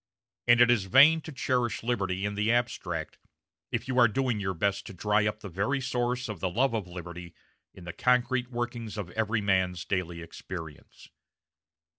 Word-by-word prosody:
And 120 Hz, 0 st, +6 dB
it 120 Hz, 0 st, +7 dB
is 110 Hz, -6 st, +2 dB
vain 145 Hz, -, +6 dB
to 160 Hz, -, -9 dB
cherish 125 Hz, -4 st, -1 dB
liberty 100 Hz, -5 st, -1 dB
in 105 Hz, -, -2 dB
the 105 Hz, +2 st, +1 dB
abstract 120 Hz, 0 st, -2 dB, 0.5 s
if 120 Hz, 0 st, -2 dB
you 130 Hz, -1 st, +1 dB
are 120 Hz, -, +7 dB
doing 125 Hz, -1 st, -1 dB
your 95 Hz, -2 st, -2 dB
best 100 Hz, +4 st, -1 dB
to 100 Hz, -, -9 dB
dry 105 Hz, +3 st, +2 dB
up 105 Hz, -, -3 dB
the -, -, -7 dB
very 100 Hz, +10 st, -1 dB
source 125 Hz, -1 st, -1 dB
of 105 Hz, -2 st, -6 dB
the 95 Hz, -, -1 dB
love 120 Hz, +7 st, +1 dB
of 105 Hz, -5 st, -2 dB
liberty 85 Hz, -1 st, -9 dB, 0.4 s
in 90 Hz, -, -12 dB
the 85 Hz, -, -7 dB
concrete 125 Hz, 0 st, +1 dB
workings 120 Hz, -2 st, -4 dB
of 95 Hz, -4 st, -5 dB
every 110 Hz, 0 st, 0 dB
man's 95 Hz, -3 st, +1 dB
daily 90 Hz, -3 st, -2 dB
experience. 80 Hz, -2 st, -9 dB
110 Hz, 180 wpm, -28 LUFS, 95-120 Hz, 0.5 s, it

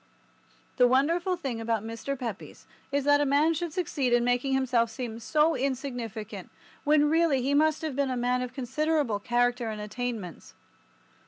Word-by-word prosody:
The 250 Hz, -, +6 dB
wonderful 335 Hz, +8 st, +2 dB
thing 265 Hz, -9 st, -4 dB
about 225 Hz, -2 st, -1 dB
Mr. 230 Hz, +5 st, -4 dB
Pepys 230 Hz, -6 st, -7 dB, 0.3 s
is 285 Hz, 0 st, 0 dB
that 290 Hz, +1 st, +4 dB
a -, -, +4 dB
man 290 Hz, +4 st, +3 dB
should 335 Hz, +1 st, -3 dB
succeed 295 Hz, -7 st, -1 dB
in 240 Hz, 0 st, +4 dB
making 245 Hz, +2 st, +1 dB
himself 250 Hz, -3 st, +2 dB
seem 230 Hz, 0 st, -6 dB
so 305 Hz, +7 st, +2 dB
insignificant 245 Hz, -5 st, -4 dB, 0.3 s
when 295 Hz, 0 st, +4 dB
really 315 Hz, -4 st, +2 dB
he 275 Hz, +2 st, +1 dB
must 310 Hz, +2 st, +2 dB
have 310 Hz, -4 st, -3 dB
been 280 Hz, -1 st, 0 dB
a 255 Hz, -, -2 dB
man 250 Hz, +1 st, +1 dB
of 250 Hz, -1 st, -4 dB
considerable 270 Hz, -2 st, -1 dB
character 240 Hz, +1 st, 0 dB
and 215 Hz, -1 st, -5 dB
attainments. 210 Hz, -4 st, -5 dB
260 Hz, 165 wpm, -28 LUFS, 240-295 Hz, 0.3 s, The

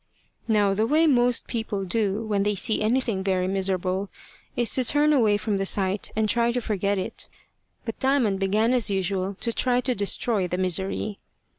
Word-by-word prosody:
Now 205 Hz, -3 st, +2 dB
the 215 Hz, +3 st, 0 dB
way 310 Hz, +5 st, +3 dB
most 245 Hz, -5 st, +2 dB
people 220 Hz, -4 st, -3 dB
do 210 Hz, +2 st, -1 dB
when 205 Hz, -2 st, 0 dB
they 205 Hz, +1 st, 0 dB
see 215 Hz, +3 st, +2 dB
anything 225 Hz, -3 st, 0 dB
very 185 Hz, -1 st, 0 dB
miserable 190 Hz, 0 st, -1 dB, 0.5 s
is 240 Hz, -3 st, -1 dB
to 260 Hz, -, 0 dB
turn 295 Hz, +4 st, +3 dB
away 220 Hz, -7 st, +3 dB
from 205 Hz, 0 st, -2 dB
the 195 Hz, -, -1 dB
sight, 195 Hz, 0 st, +1 dB
and 220 Hz, 0 st, +1 dB
try 235 Hz, +2 st, +2 dB
to 245 Hz, -, -1 dB
forget 205 Hz, -3 st, -1 dB
it. 185 Hz, -, -5 dB, 0.6 s
But 225 Hz, -, -6 dB
Diamond 260 Hz, -8 st, +1 dB
began 210 Hz, +5 st, +1 dB
as 240 Hz, -4 st, +2 dB
usual 195 Hz, 0 st, -1 dB
to 230 Hz, -, -1 dB
try 250 Hz, +1 st, +1 dB
to 250 Hz, 0 st, 0 dB
destroy 200 Hz, -1 st, 0 dB
the 180 Hz, -, -3 dB
misery. 190 Hz, +3 st, -1 dB
210 Hz, 180 wpm, -24 LUFS, 195-235 Hz, 0.6 s, way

